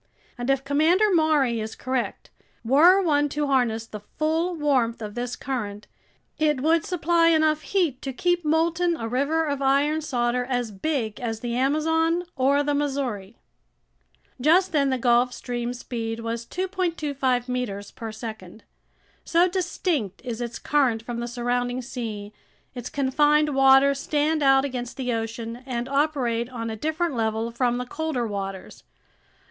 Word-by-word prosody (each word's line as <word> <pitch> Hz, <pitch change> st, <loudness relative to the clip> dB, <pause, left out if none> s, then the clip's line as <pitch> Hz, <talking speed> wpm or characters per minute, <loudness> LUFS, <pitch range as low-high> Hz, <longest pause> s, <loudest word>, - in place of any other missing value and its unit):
And 245 Hz, +1 st, -4 dB
if 270 Hz, 0 st, +2 dB
Commander 330 Hz, +9 st, +3 dB
Maury 300 Hz, -8 st, +3 dB
is 220 Hz, 0 st, -5 dB
correct, 255 Hz, -1 st, -3 dB, 0.3 s
were 320 Hz, +10 st, +6 dB
one 295 Hz, -3 st, +2 dB
to 295 Hz, +1 st, -1 dB
harness 245 Hz, -5 st, +1 dB
the 215 Hz, -1 st, -8 dB
full 320 Hz, -, -1 dB
warmth 265 Hz, -7 st, +1 dB
of 210 Hz, -2 st, -6 dB
this 245 Hz, +1 st, -3 dB
current, 210 Hz, -6 st, -4 dB, 0.5 s
it 300 Hz, -4 st, +2 dB
would 320 Hz, +2 st, +3 dB
supply 340 Hz, -1 st, +2 dB
enough 315 Hz, -2 st, +3 dB
heat 320 Hz, -6 st, 0 dB
to 270 Hz, -, -4 dB
keep 350 Hz, +6 st, 0 dB
molten 330 Hz, +2 st, +1 dB
a 225 Hz, -, -4 dB
river 285 Hz, +7 st, +1 dB
of 285 Hz, -2 st, -2 dB
iron 285 Hz, +3 st, +2 dB
solder 250 Hz, -4 st, 0 dB
as 245 Hz, -3 st, -2 dB
big 220 Hz, 0 st, -2 dB
as 225 Hz, -2 st, -4 dB
the 235 Hz, -1 st, -3 dB
Amazon 320 Hz, +6 st, +1 dB
or 280 Hz, +2 st, +3 dB
the 290 Hz, 0 st, 0 dB
Missouri." 265 Hz, -8 st, -2 dB, 1.0 s
Just 345 Hz, +7 st, +4 dB
then 280 Hz, -4 st, +2 dB
the 260 Hz, -, +1 dB
Gulf 245 Hz, 0 st, +3 dB
Stream's 245 Hz, 0 st, -4 dB
speed 225 Hz, -1 st, -4 dB
was 230 Hz, 0 st, -4 dB
2.25 310 Hz, -9 st, -1 dB
meters 220 Hz, -6 st, -4 dB
per 225 Hz, -1 st, -7 dB
second. 220 Hz, -3 st, -9 dB, 0.6 s
So 345 Hz, +2 st, +3 dB
distinct 350 Hz, -, -2 dB
is 240 Hz, -1 st, -4 dB
its 235 Hz, -1 st, -4 dB
current 255 Hz, -7 st, +1 dB
from 235 Hz, 0 st, -5 dB
the 240 Hz, -, -3 dB
surrounding 245 Hz, +1 st, -2 dB
sea, 220 Hz, -5 st, -6 dB, 0.4 s
its 245 Hz, -1 st, -6 dB
confined 295 Hz, +2 st, +2 dB
waters 270 Hz, +1 st, +5 dB
stand 300 Hz, +2 st, 0 dB
out 270 Hz, -1 st, +5 dB
against 250 Hz, -3 st, -5 dB
the 250 Hz, -2 st, -1 dB
ocean 225 Hz, +1 st, -4 dB
and 240 Hz, -1 st, -3 dB
operate 270 Hz, -5 st, 0 dB
on 230 Hz, -3 st, -5 dB
a -, -, -4 dB
different 315 Hz, +6 st, -1 dB
level 225 Hz, 0 st, -1 dB
from 240 Hz, 0 st, 0 dB
the 250 Hz, -, -3 dB
colder 290 Hz, -2 st, -2 dB
waters. 195 Hz, -3 st, -6 dB
265 Hz, 155 wpm, -25 LUFS, 235-305 Hz, 1.0 s, were